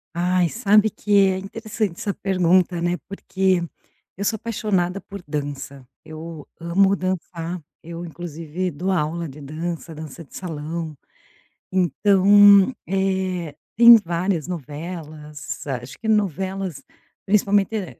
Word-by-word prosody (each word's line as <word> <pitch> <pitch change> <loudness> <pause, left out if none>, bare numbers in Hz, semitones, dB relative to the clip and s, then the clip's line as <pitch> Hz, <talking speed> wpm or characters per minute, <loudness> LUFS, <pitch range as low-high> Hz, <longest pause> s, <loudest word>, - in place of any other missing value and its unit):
Ai, 180 0 +2
sabe 215 0 +4
que 210 0 -7 0.2
é 190 -1 0
interessante 210 -1 -4
essa 200 - -2
pergunta, 180 -2 +2
né, 175 +1 0
porque 190 -2 0 0.5
eu 200 - -4
sou 220 - +1
apaixonada 200 -5 -1
por 200 +1 -9
dança. 140 -2 -5 0.2
Eu 155 -1 -9
amo 190 +4 +3
dançar, 180 -2 -4 0.2
eu, 170 +1 -7
inclusive, 170 +1 -5
dou 175 +6 -3
aula 170 -1 -1
de 140 +3 -12
dança, 165 +3 -5
dança 155 +1 -9
de 145 - -17
salão. 160 -2 -5 0.7
Então, 200 - +6 0.2
eh, 190 -4 -1 0.2
tem 235 +1 +10
várias 175 -4 -1
novelas. 150 -3 -7
Acho 130 -3 -5
que 220 - -7
novelas, 195 -4 -1 0.4
principalmente, 205 +1 +2
eh, 195 -5 -5
180 Hz, 120 wpm, -22 LUFS, 160-195 Hz, 0.7 s, tem